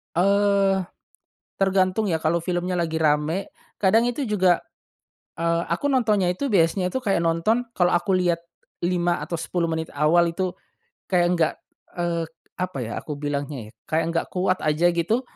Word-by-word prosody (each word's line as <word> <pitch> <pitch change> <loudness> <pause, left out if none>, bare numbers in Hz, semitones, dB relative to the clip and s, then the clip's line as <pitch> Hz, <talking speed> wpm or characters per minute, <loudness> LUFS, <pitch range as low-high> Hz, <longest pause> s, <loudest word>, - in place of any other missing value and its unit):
Eee, 200 +1 +3 0.8
tergantung 195 +2 +2
ya 165 - +1
kalau 160 +1 0
filmnya 180 +1 -2
lagi 165 -2 -1
rame 155 +4 0 0.2
kadang 225 +5 +3
itu 270 +3 -2
juga 185 -5 +2 0.7
eee, 170 0 +1
aku 285 - 0
nontonnya 215 -8 +2
itu 185 +10 -1
biasanya 180 0 +2
itu 260 - -1
kayak 195 -8 0
nonton 170 +9 +1
kalau 175 -4 +2
aku 175 +2 0
lihat 175 -2 +1 0.4
5 175 -1 +1
atau 170 - -4
10 170 +1 -2
menit 160 0 -2
awal 165 +4 +4
itu 180 +2 -2 0.5
kayak 180 -2 +2
enggak, 170 -3 +2 0.4
eee, 170 -1 -1 0.3
apa 185 -2 -3
ya 115 0 -4
aku 150 - -5
bilangnya 140 -5 -4
ya, - - -17
kayak 160 +1 0
nggak 165 0 0
kuat 185 0 +1
aja 155 +3 +3
gitu, 175 +8 0
175 Hz, 155 wpm, -24 LUFS, 165-195 Hz, 0.8 s, awal